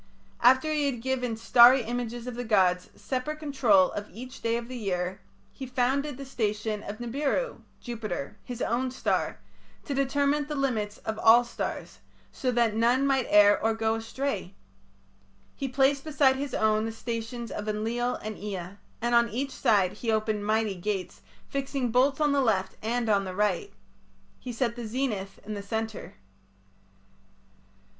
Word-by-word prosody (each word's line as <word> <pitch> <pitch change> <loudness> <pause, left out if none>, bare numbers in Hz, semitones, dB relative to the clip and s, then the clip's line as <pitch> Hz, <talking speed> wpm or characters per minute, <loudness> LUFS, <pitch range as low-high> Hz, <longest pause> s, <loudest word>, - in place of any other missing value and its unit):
After 260 +6 +5
he 295 -2 +1
had 255 -4 -2
given 250 -3 -1
starry 240 +2 +7
images 240 0 -4
of 250 - -5
the 245 +1 -4
gods 185 -5 +2
separate 265 +4 -3
control 250 -11 +3
of 205 0 -6
each 250 +6 -10
day 230 0 +1
of 235 0 -6
the 255 - -7
year, 185 -4 -2 0.3
he 265 - -7
founded 260 +2 0
the 275 - -7
station 215 -4 -2
of 205 +1 -7
Nibiru 280 - -2 0.2
(Jupiter), 215 - -5
his 245 -1 -5
own 250 +3 0
star, 255 - -1 0.5
to 285 - -3
determine 280 +2 +1
the 300 - -4
limits 225 -7 -1
of 220 0 -3
all 235 +2 +7
stars, 235 - -5 0.3
so 255 - -2
that 235 -3 +2
none 240 +4 +3
might 270 -2 +2
err 205 0 +6
or 225 0 +2
go 225 0 +1
astray. 225 -4 -3 1.0
He 275 - -3
placed 270 +1 +2
beside 285 -4 +3
his 275 -1 -4
own 215 0 +2
the 225 - -3
stations 230 +1 -5
of 210 +1 -4
Enlil 235 +4 -1
and 215 0 -5
Ea, 195 -2 -6 0.3
and 240 0 +1
on 235 0 +5
each 270 +6 -3
side 205 -10 +2
he 230 - -2
opened 215 -1 0
mighty 215 -1 +1
gates, 190 0 -4 0.3
fixing 270 -3 -2
bolts 265 +4 +3
on 300 -1 +3
the 280 -1 +3
left 200 -7 +1
and 235 +2 -1
on 200 -2 +3
the 185 -1 -6
right. 205 -3 0 0.7
He 250 - -6
set 235 0 -1
the 240 -2 -5
zenith 215 -5 -3
in 215 - -5
the 205 - -4
centre. 220 +2 -4
235 Hz, 165 wpm, -28 LUFS, 215-260 Hz, 1.0 s, starry